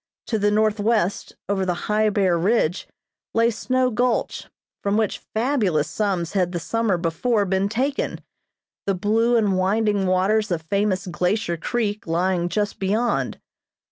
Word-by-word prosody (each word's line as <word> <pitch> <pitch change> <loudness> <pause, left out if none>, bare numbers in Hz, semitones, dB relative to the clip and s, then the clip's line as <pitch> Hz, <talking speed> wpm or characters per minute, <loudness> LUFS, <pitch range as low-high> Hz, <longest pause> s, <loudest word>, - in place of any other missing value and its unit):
To 220 - -1
the 205 +1 +3
northwest, 215 -1 +1
over 195 -1 0
the 180 -2 0
high, 215 0 +2
bare 195 -4 +2
ridge, 180 -1 +1 0.5
lay 230 +1 +4
Snow 255 +3 0
Gulch, 245 +1 -1 0.3
from 200 +1 0
which 220 -3 0
fabulous 220 - 0
sums 175 0 -1
had 180 -2 0
the 175 - -1
summer 225 +1 0
before 200 +6 0
been 190 +1 0
taken, 265 +6 -1 0.7
the 195 - +2
blue 225 +5 +2
and 200 -4 +2
winding 200 0 +1
waters 200 +4 +2
of 170 -3 -2
famous 200 +2 0
Glacier 180 +1 -1
Creek 210 +3 -2
lying 175 +1 0
just 205 +2 -2
beyond. 215 +5 0
205 Hz, 140 wpm, -23 LUFS, 185-220 Hz, 0.7 s, lay